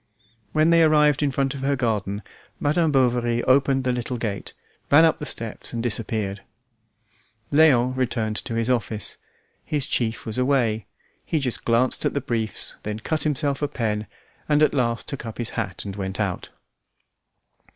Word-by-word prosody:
When 155 Hz, +2 st, +3 dB
they 165 Hz, 0 st, +6 dB
arrived 150 Hz, -2 st, +4 dB
in 145 Hz, -, +2 dB
front 135 Hz, 0 st, 0 dB
of 140 Hz, -, -7 dB
her 140 Hz, +1 st, +1 dB
garden, 105 Hz, -5 st, -1 dB, 0.4 s
Madame 155 Hz, +2 st, +2 dB
Bovary 120 Hz, -3 st, +2 dB
opened 135 Hz, 0 st, +3 dB
the 130 Hz, -, +1 dB
little 125 Hz, 0 st, -3 dB
gate, 105 Hz, -4 st, -4 dB, 0.4 s
ran 155 Hz, +3 st, +7 dB
up 160 Hz, -, +2 dB
the 150 Hz, -, -4 dB
steps 115 Hz, +1 st, -4 dB
and 115 Hz, -1 st, -2 dB
disappeared. 105 Hz, -3 st, -1 dB, 1.1 s
Léon 130 Hz, -5 st, +5 dB
returned 115 Hz, -4 st, -1 dB
to 115 Hz, -, -4 dB
his 115 Hz, 0 st, 0 dB
office. 115 Hz, -4 st, -1 dB, 0.4 s
His 145 Hz, -3 st, 0 dB
chief 115 Hz, -2 st, -1 dB
was 110 Hz, +2 st, -2 dB
away; 120 Hz, -6 st, +1 dB, 0.4 s
he 160 Hz, -, -1 dB
just 130 Hz, -5 st, -1 dB
glanced 120 Hz, +2 st, +2 dB
at -, -, 0 dB
the -, -, +2 dB
briefs, 110 Hz, -4 st, -2 dB
then 105 Hz, 0 st, -4 dB
cut 155 Hz, +7 st, -2 dB
himself 145 Hz, -1 st, 0 dB
a 145 Hz, -, +1 dB
pen, 105 Hz, -5 st, -2 dB, 0.4 s
and 150 Hz, 0 st, +4 dB
at -, -, +3 dB
last 120 Hz, -4 st, 0 dB
took 140 Hz, -, -3 dB
up 115 Hz, -2 st, -7 dB
his 120 Hz, -2 st, -2 dB
hat 100 Hz, -5 st, -4 dB
and 100 Hz, -1 st, -5 dB
went 95 Hz, 0 st, -2 dB
out. 100 Hz, -4 st, -2 dB
125 Hz, 170 wpm, -24 LUFS, 110-140 Hz, 1.1 s, ran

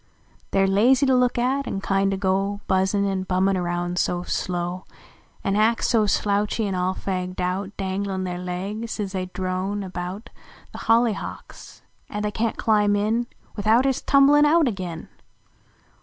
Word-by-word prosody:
/ -, -, -33 dB
re 195 Hz, 0 st, +3 dB
lazy 235 Hz, +8 st, +4 dB
to 265 Hz, -, +3 dB
look 250 Hz, -1 st, +2 dB
at, 260 Hz, +3 st, 0 dB
an 195 Hz, -, -2 dB
kindo 195 Hz, 0 st, 0 dB
go 195 Hz, +1 st, 0 dB
Buzzin 190 Hz, +2 st, +2 dB
an 195 Hz, -1 st, -1 dB
bummin 190 Hz, +1 st, +1 dB
aroun 175 Hz, 0 st, -2 dB
so 180 Hz, 0 st, 0 dB
slow, 180 Hz, 0 st, -3 dB, 0.6 s
An 195 Hz, -, 0 dB
ac 220 Hz, +2 st, +2 dB
so 220 Hz, -3 st, +3 dB
slouchy 205 Hz, +2 st, 0 dB
an 195 Hz, -, -2 dB
all 185 Hz, +1 st, 0 dB
fagged 185 Hz, -1 st, -4 dB
out, 185 Hz, +3 st, -2 dB
Danglin 190 Hz, 0 st, -2 dB
their 180 Hz, -1 st, -4 dB
legs 195 Hz, +6 st, -4 dB
as 200 Hz, -2 st, -2 dB
they 185 Hz, -1 st, -3 dB
drone 185 Hz, +2 st, -3 dB
about 185 Hz, +3 st, -6 dB, 0.4 s
The -, -, -9 dB
hollyhawks 230 Hz, -2 st, -1 dB, 0.3 s
at 210 Hz, 0 st, -4 dB
they 210 Hz, -, -1 dB
can 225 Hz, +1 st, -1 dB
t -, -, -24 dB
climb 210 Hz, -2 st, +2 dB
in 220 Hz, +4 st, 0 dB, 0.3 s
Tthout 220 Hz, +5 st, +3 dB
ist 270 Hz, -2 st, +1 dB
a -, -, -33 dB
tumble 275 Hz, +1 st, +6 dB
un 295 Hz, 0 st, +6 dB
out 320 Hz, -1 st, +4 dB
agin 180 Hz, -7 st, -4 dB
195 Hz, 170 wpm, -23 LUFS, 185-220 Hz, 0.6 s, tumble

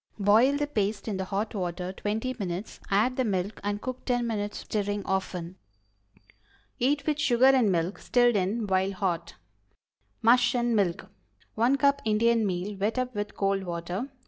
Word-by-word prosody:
Boil 220 Hz, +7 st, +4 dB
the 295 Hz, -, 0 dB
paste 215 Hz, -7 st, -2 dB
in 205 Hz, -3 st, -2 dB
the 190 Hz, -, -3 dB
hot 200 Hz, +3 st, -2 dB
water 180 Hz, -2 st, -3 dB
twenty 220 Hz, +6 st, -3 dB
minutes; 185 Hz, +1 st, -5 dB
add 220 Hz, +6 st, +2 dB
the 260 Hz, -, +2 dB
milk 200 Hz, -2 st, -2 dB
and 205 Hz, 0 st, -2 dB
cook 255 Hz, 0 st, -5 dB
ten 245 Hz, -2 st, 0 dB
minutes 210 Hz, -2 st, -3 dB
more, -, -, -14 dB
stirring 205 Hz, -1 st, -2 dB
often. 185 Hz, -2 st, -3 dB, 1.2 s
Eat 280 Hz, +3 st, +1 dB
with 300 Hz, -1 st, 0 dB
sugar 250 Hz, -3 st, +3 dB
and 260 Hz, -6 st, +5 dB
milk, 175 Hz, +2 st, -1 dB
stirred 245 Hz, -2 st, +3 dB
in 205 Hz, +4 st, 0 dB
while 190 Hz, 0 st, +1 dB
hot. 175 Hz, -3 st, -2 dB, 0.9 s
MUSH 245 Hz, +2 st, +5 dB
AND 240 Hz, -1 st, +1 dB
MILK. 190 Hz, -5 st, 0 dB, 0.5 s
1 240 Hz, +5 st, +3 dB
cup 280 Hz, 0 st, +3 dB
Indian 225 Hz, 0 st, +2 dB
meal, 185 Hz, +2 st, -3 dB
wet 210 Hz, +5 st, -1 dB
up 255 Hz, 0 st, -1 dB
with 205 Hz, -1 st, -4 dB
cold 195 Hz, 0 st, +1 dB
water. 180 Hz, +7 st, -4 dB
210 Hz, 170 wpm, -27 LUFS, 190-245 Hz, 1.2 s, and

